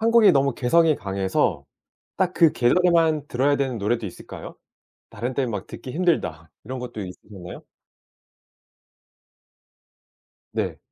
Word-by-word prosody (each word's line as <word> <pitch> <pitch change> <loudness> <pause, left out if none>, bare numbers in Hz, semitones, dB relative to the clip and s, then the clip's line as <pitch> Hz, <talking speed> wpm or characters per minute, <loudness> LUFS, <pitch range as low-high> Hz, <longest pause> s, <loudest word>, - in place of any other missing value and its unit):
한국이 230 -1 +6
너무 140 -2 +2
개성이 155 +5 +3
강해서 95 -1 -1 0.5
딱 185 -1 +1
그 165 -3 +5
계절에만 160 +2 +3
들어야 140 +3 +2
되는 130 -4 -1
노래도 110 +2 -1
있을까요? 90 - -9 0.5
'다른 120 +5 -4
때는 130 -2 -1
막 100 -3 -5
듣기 130 - -8
힘들다.' 125 - 0 0.2
이런 130 +3 -5
것도 125 -3 -6
있으셨나요? 90 -1 -10 2.9
네. - - -2
130 Hz, 270 characters per minute, -24 LUFS, 105-165 Hz, 2.9 s, 한국이